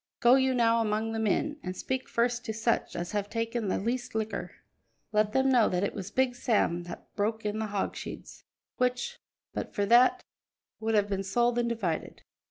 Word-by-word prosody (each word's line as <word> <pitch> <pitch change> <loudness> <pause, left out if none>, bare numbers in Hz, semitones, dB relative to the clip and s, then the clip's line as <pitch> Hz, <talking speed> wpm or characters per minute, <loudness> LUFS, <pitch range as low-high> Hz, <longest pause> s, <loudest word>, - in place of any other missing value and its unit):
"Go 240 +1 +6
you 265 -1 +4
now 230 -1 +4
among 220 0 0
the 225 - -2
men, 255 +8 0
and 185 -4 -5
speak 260 0 -3
first 240 +1 +1
to 220 - -2
such 225 +2 0
as 175 0 -3
have 205 -1 -2
taken 230 -1 -2
the - - +1
least 240 +3 -2
liquor; 220 0 -2 0.6
let 210 -1 +2
them 265 +3 +2
know 245 -4 +5
that 180 +1 0
it 200 - -1
was 195 -1 -6
Big 260 +2 +1
Sam 205 -8 +1
that 175 - -10
broke 220 +1 -1
in 210 +1 -1
the 220 - -1
hogsheads, 200 -1 -5 0.3
which, 250 - -1 0.3
but - - -5
for 205 - +1
that, 240 +4 +5 0.6
would 220 0 0
have 205 -1 +3
been 195 -1 -1
sold 240 +5 +1
and 235 0 +1
divided. 195 -9 -3
225 Hz, 190 wpm, -29 LUFS, 205-245 Hz, 0.6 s, Go